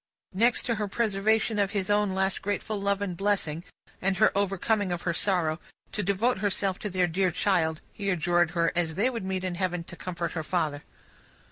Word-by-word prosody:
Next 230 +5 +3
to 235 - 0
her 210 - 0
preservation 215 +1 +1
of 200 0 +1
his 195 +1 0
own 205 -2 +2
last 190 0 0
grateful 205 +1 -2
love 200 0 +1
and 185 -3 -3
blessing, 175 -5 -1 0.4
and 190 0 +1
her 215 - +4
overcoming 200 0 +1
of 175 -1 -3
her 170 - 0
sorrow, 170 -4 +1 0.3
to 210 - -2
devote 200 +4 +1
herself 195 -1 0
to 210 - -3
their 185 -1 +2
dear 185 +2 +1
child, 160 -3 +1
he 200 -1 -3
adjured 175 -1 +2
her, 170 0 +3
as 165 -2 0
they 225 +8 +2
would 230 -5 -4
meet 190 -1 -2
in 185 -1 -2
Heaven, 180 -1 -1
to 175 - -10
comfort 170 -1 -4
her 160 - -3
father. 155 -3 -1
190 Hz, 200 wpm, -27 LUFS, 175-205 Hz, 0.4 s, her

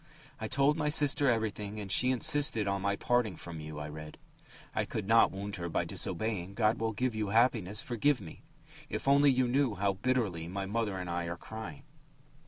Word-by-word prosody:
"I 110 - -4
told 140 +5 +2
my 150 -2 0
sister 145 -2 +4
everything 110 -2 -2
and 100 -2 -6
she 125 +6 +5
insisted 130 -3 +3
on 100 0 -1
my 100 +1 0
parting 120 -3 0
from 85 0 -9
you," 75 0 -8
I 75 - -5
read. 75 0 -9 0.6
"I - - 0
could 105 -3 -5
not 115 +1 +5
wound 100 +1 -6
her 85 -1 -4
by - - -1
disobeying. 100 0 -1
God 110 +1 +1
will 115 0 -1
give 125 +3 -1
you 110 -1 -2
happiness. 110 -2 +1
Forgive 125 +4 +1
me. 85 -6 -11 0.5
If - - -5
only 140 +1 +5
you 130 -1 +2
knew 130 -3 +1
how 100 +1 0
bitterly 100 -6 -1
my 95 +2 -4
mother 105 -1 -2
and 90 -1 -5
I 85 0 -2
are 85 +1 -5
crying!" 110 -8 -9
105 Hz, 195 wpm, -31 LUFS, 95-125 Hz, 0.6 s, she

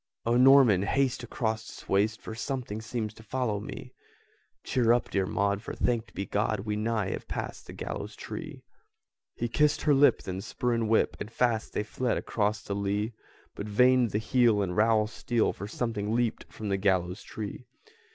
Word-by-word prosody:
"O 115 +1 +2
Norman, 130 -6 +7
haste 130 +4 +1
across 110 -2 -2
this - - -11
waste 105 +3 +1
For - - -6
something 120 -3 -4
seems 110 -1 -3
to 110 - -14
follow 115 -3 -1
me!" 105 - -8 0.7
"Cheer 120 -2 +3
up, 120 - 0
dear 95 -1 +1
Maud, 100 +1 0
for, 115 - -6
thanked 120 -2 -1
be 100 - -3
God, 105 0 0
We 105 0 -2
nigh 110 -2 -1
have - - -5
passed - - -5
the - - -8
gallows - - -5
tree!" - - -7 0.7
He 120 - -2
kissed 150 +5 +2
her 150 - +4
lip; 140 +1 +5
then 95 0 -4
spur 120 +3 -2
and 115 -2 0
whip! 110 - +2
And 105 - -5
fast 115 -2 0
they - - 0
fled 120 +3 -1
across 105 -1 -1
the 100 - -4
lea! 100 +3 -1 0.4
But 100 - -6
vain 125 +3 +4
the 105 - -1
heel 110 -2 +3
and 90 -2 -3
rowel 110 0 +4
steel, 115 +1 0
For 100 - -7
something 110 -1 -2
leaped 120 -2 -1
from 105 -2 -5
the 100 - +1
gallows 95 -2 +1
tree! 110 +3 -7
110 Hz, 185 wpm, -28 LUFS, 105-120 Hz, 0.7 s, Norman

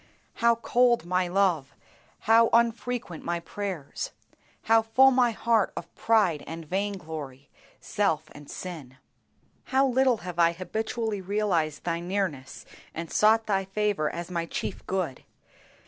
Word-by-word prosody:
How 235 0 +5
cold 240 -1 +2
my 180 +1 +1
love, 175 -7 +1 0.5
how 225 +1 +5
unfrequent 235 -5 0
my 170 0 -2
prayers! 190 - -5 0.5
How 225 0 +5
full 260 +4 +5
my 250 -2 +4
heart 225 -2 +1
of 170 - -7
pride 210 -9 +2
and 165 0 -7
vain 200 +5 -1
glory, 145 -5 -8 0.3
self 160 -7 -1
and 145 -1 -13
sin! 150 -8 -8 0.7
How 270 +1 +2
little 260 -1 +3
have 175 -1 -6
I 170 0 +5
habitually 220 +3 -3
realized 185 -6 -1
Thy 170 -1 -1
nearness 175 -7 -3 0.3
and 165 0 -5
sought 220 +1 +4
Thy 195 -2 +1
favor 195 -4 -1
as 170 +1 -6
my 170 -1 -2
chief - - -5
good! 185 -8 -2
190 Hz, 135 wpm, -27 LUFS, 165-225 Hz, 0.7 s, How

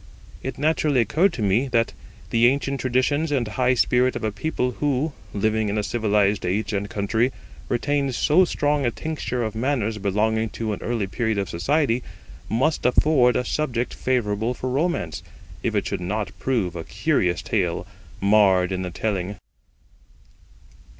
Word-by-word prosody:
It 130 -2 -5
naturally 150 -2 +2
occurred 160 - +3
to 115 - -3
me 105 +7 +2
that 115 -3 +1 0.4
the 115 +1 +5
ancient 140 +1 0
traditions 130 +5 +1
and 130 -5 +1
high 125 +4 +1
spirit 125 +1 +2
of - - -4
a 110 - 0
people 125 +3 -1
who, 145 +1 0 0.2
living 110 +1 0
in 105 - -1
a 105 - 0
civilised 105 -2 +1
age 105 +4 -1
and 100 0 -2
country, 110 +5 0 0.4
retained 140 +1 0
so 160 +9 +4
strong 145 -4 0
a 120 - +2
tincture 125 -2 -3
of 110 - -3
manners 115 -3 -1
belonging 110 +3 +1
to 110 -2 -2
an 100 - -6
early 115 -3 -1
period 110 +3 -1
of 100 -1 -1
society, 130 - +1 0.5
must 140 +8 +1
afford 125 0 +4
a 125 - 0
subject 125 -5 -1
favourable 115 -2 0
for 130 +1 -3
romance, 135 - -1 0.4
if - - -1
it - - +1
should - - -3
not 100 +3 -2
prove 110 -10 0
a 85 - -4
curious 90 +1 0
tale 90 -6 -1 0.3
marred 100 -3 +4
in 95 -1 -2
the 90 - -3
telling. 100 +1 -2
115 Hz, 160 wpm, -23 LUFS, 105-135 Hz, 0.5 s, the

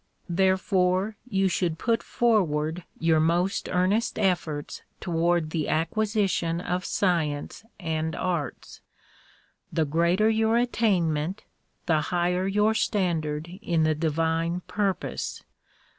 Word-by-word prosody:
Therefore 190 +2 +2
you 195 -3 +2
should 175 -3 0
put 230 +4 +1
forward 170 -8 +1
your 160 -1 +3
most 175 +4 +1
earnest 185 +6 +1
efforts 170 -6 -1 0.2
toward 170 -2 0
the 155 -3 -1
acquisition 190 -1 0
of 180 +1 -2
science 160 -4 -1 0.2
and 160 -2 -2
arts. 175 -5 -3 0.9
The 160 -1 +1
greater 170 +7 +2
your 220 +1 +3
attainment, 190 -8 +1 0.4
the 160 -3 +2
higher 180 +3 0
your 210 +2 +2
standard 165 -8 0
in 170 -6 +1
the 155 0 +3
di 160 +2 -1
vine 165 +3 0
purpose. 200 0 -3
175 Hz, 110 wpm, -26 LUFS, 160-195 Hz, 0.9 s, your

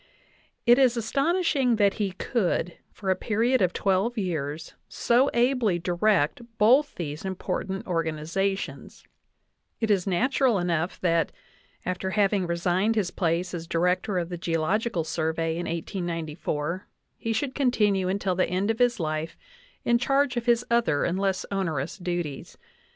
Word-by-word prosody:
It 240 +2 +6
is 250 -3 +4
as 225 -1 -3
tonishing 280 -5 +2
that 200 -2 +4
he 195 -3 -1
could, 185 -4 -1 0.2
for 190 -2 -2
a - - +3
period 230 +6 +1
of 180 -2 +3
twelve 195 +6 0
years, 160 -5 -3 0.2
so 250 +4 +2
ably 240 -6 +2
direct 175 +1 +1 0.2
both 260 +8 +4
these 155 -3 -5
important 190 0 -3
organizations; 165 +3 -2 0.8
it 225 -2 +1
is 195 -2 +1
natural 250 +4 +2
enough 175 -1 -1
that, 170 -2 +2 0.5
after 185 +1 -2
having 195 -2 +1
resigned 180 +5 +1
his 195 -5 0
place 170 +1 -1
as 165 -1 -5
Director 180 +4 +1
of 175 -1 -2
the 175 -2 -5
Geo 165 -2 -1
logical 195 +1 0
Survey 160 0 -1
in 170 +2 -3
1894, 165 -1 -3 0.3
he 230 - -2
should 260 +4 -1
continue 210 -8 +2
until 195 -1 0
the 185 +1 +1
end 190 +4 +1
of 225 - -5
his 245 -2 +3
life 155 0 -3 0.5
in 235 0 +3
charge 275 0 +2
of 240 0 -3
his 240 0 +3
other 235 -12 +2
and 180 +2 0
less 195 -1 0
onerous 165 -6 -2
duties. 175 -6 -4
190 Hz, 150 wpm, -26 LUFS, 170-230 Hz, 0.8 s, It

